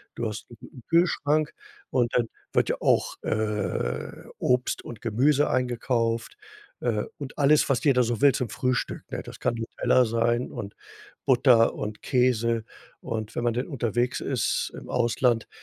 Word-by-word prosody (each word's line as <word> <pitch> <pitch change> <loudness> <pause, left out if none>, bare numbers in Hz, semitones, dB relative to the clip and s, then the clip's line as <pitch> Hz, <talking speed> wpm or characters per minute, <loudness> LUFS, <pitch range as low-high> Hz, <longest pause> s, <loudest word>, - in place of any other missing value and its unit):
Du 115 - -2
hast 105 0 -6
'n 120 +1 -13
Kühlschrank 155 -3 +2 0.4
und 120 -2 +1
dann 120 -2 +2 0.3
wird - - +2
ja - - +1
auch, - - +2
äh, 105 - -1 0.3
Obst 125 0 0
und 115 -3 -9
Gemüse 135 +6 +2
eingekauft, 120 - -1 0.4
äh, 110 -4 0 0.2
und 140 -2 -7
alles, 145 +1 +4
was 135 +1 +1
jeder 135 -5 +4
so 120 0 -2
will 140 -2 +6
zum 120 -3 -2
Frühstück, 125 +2 -1
ne? - - -3
Das - - -11
kann - - 0
Nutella 115 +2 +2
sein 115 +2 0
und 100 0 -7 0.5
Butter 125 -3 +5
und 105 0 -5
Käse. 115 -3 +1 0.4
Und 110 0 -5
wenn - - -2
man 120 -1 +1
denn 125 +2 -2
unterwegs 120 -4 -1
ist - - -1
im - - -11
Ausland, 120 -1 +1
120 Hz, 155 wpm, -26 LUFS, 115-130 Hz, 0.5 s, will